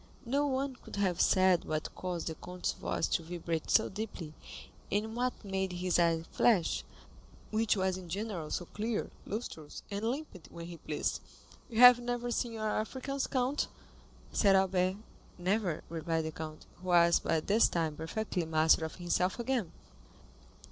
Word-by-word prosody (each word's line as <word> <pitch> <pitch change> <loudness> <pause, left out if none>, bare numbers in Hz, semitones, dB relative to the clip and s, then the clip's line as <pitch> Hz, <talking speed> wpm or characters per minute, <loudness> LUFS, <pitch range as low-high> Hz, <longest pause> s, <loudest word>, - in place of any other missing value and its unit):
No 280 +5 +1
one 265 -1 -1
could - - -10
have 190 -4 +1
said 185 -2 +4
what 155 0 -3
caused 180 -2 -4
the 160 - -2
count's 180 +3 -3
voice - - -2
to - - +1
vibrate 165 -1 -4
so - - +5
deeply, 190 -6 -6 0.6
and 220 +2 -1
what 250 -2 -2
made 190 -1 -1
his 180 0 +1
eye 165 -1 +3
flash, 200 -9 +3 0.7
which 220 -1 +2
was 190 -1 0
in 180 -2 -10
general 190 -4 -3
so 175 - -2
clear, 215 +4 -3 0.2
lustrous, 180 -9 -6
and 200 +1 -3
limpid 255 - -5
when 170 0 -8
he 170 0 -8
pleased. - - -2 0.5
"You 230 0 +1
have 250 -1 +11
never 245 0 -2
seen 235 -1 -1
our 215 -1 0
Africans, 265 +4 -3
count?" 260 +2 0 0.7
said 195 -2 +5
Albert. 185 -1 +2 0.4
"Never," 185 -2 0
replied 165 0 -1
the 160 - -3
count, 155 0 -7
who 185 - -11
was 170 -1 +5
by 160 - +1
this 205 +8 +4
time 160 -3 -1
perfectly 180 +4 -2
master 160 0 +4
of 160 - -6
himself 180 +1 0
again. 235 -7 -1
185 Hz, 160 wpm, -32 LUFS, 170-225 Hz, 0.7 s, have